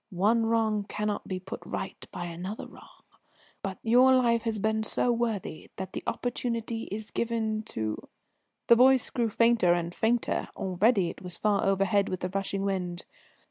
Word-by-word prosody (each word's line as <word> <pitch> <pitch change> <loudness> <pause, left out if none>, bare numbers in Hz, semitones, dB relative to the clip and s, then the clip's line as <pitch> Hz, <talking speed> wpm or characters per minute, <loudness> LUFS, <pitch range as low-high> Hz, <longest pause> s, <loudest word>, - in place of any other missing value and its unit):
One 225 +4 +3
wrong 220 -2 +1
cannot 210 -1 -2
be 185 -1 -3
put 190 +1 -8
right - - -6
by 175 - -5
another 175 +5 -6
wrong, - - -16 0.6
but 195 -2 -4
your 250 +3 +6
life 235 -2 +3
has 225 -1 0
been 220 +1 0
so 230 +2 +1
worthy 225 -9 -2
that 190 -1 -6
the - - -4
opportunity 230 -2 -2
is 215 +1 -5
given 220 -2 -1
to 110 -1 -4 0.3
" - - -51
The 235 - +8
voice 260 +1 +5
grew 235 -3 0
fainter 225 -5 +4
and 170 0 -3
fainter, 230 +4 0
already 190 0 +2
it - - -14
was 180 -1 -4
far 205 -2 +1
overhead 195 +1 +2
with 185 - -4
the 180 - -2
rushing 195 +1 -2
wind. 180 -3 -2
210 Hz, 170 wpm, -28 LUFS, 190-230 Hz, 0.6 s, The